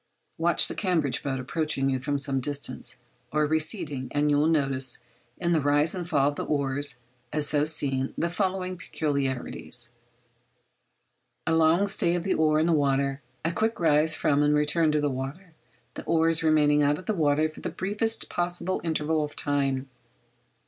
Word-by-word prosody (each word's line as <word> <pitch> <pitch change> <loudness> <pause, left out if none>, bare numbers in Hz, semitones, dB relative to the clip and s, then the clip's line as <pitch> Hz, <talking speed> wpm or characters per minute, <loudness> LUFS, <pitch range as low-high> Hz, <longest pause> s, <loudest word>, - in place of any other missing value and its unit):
Watch 170 0 +3
the - - -3
Cambridge 170 -9 0
boat 135 -2 -3
approaching 140 +1 -1
you 130 - -1
from 145 +2 -1
some 140 -1 +1
distance, 145 +2 -2 0.3
or 150 0 +2
receding, 155 -3 0
and 145 +2 +1
you 145 - +3
will 150 - +3
notice 135 -5 +1 0.3
in 175 -1 -1
the 160 -3 +2
rise 145 +2 +3
and 175 -2 -5
fall 145 -3 +3
of 145 - -7
the - - -2
oars, 140 -2 -1 0.3
as 150 -1 +2
so 145 0 +3
seen, 135 -4 +1
the 170 - 0
following 185 0 -2
peculiarities—a 140 -6 -2 1.7
long 165 +4 +4
stay 175 -3 +1
of 175 - -2
the 195 - 0
oar 155 -1 +2
in 160 - +2
the 170 - +2
water, 140 -1 +1 0.2
a 165 - +1
quick 220 +6 -1
rise 155 -1 +3
from 145 0 +1
and 150 0 +3
return 150 +2 +2
to 150 - +1
the 145 - 0
water, 140 +7 -6 0.4
the - - -7
oars 165 -1 +3
remaining 150 -2 +3
out 145 0 +2
of 185 - -11
the 215 - 0
water 155 -3 +2
for 155 - -12
the - - -4
briefest 210 +4 -2
possible 175 +1 -1
interval 160 -1 0
of 150 0 -6
time. 140 -2 -1
150 Hz, 175 wpm, -26 LUFS, 140-165 Hz, 1.7 s, long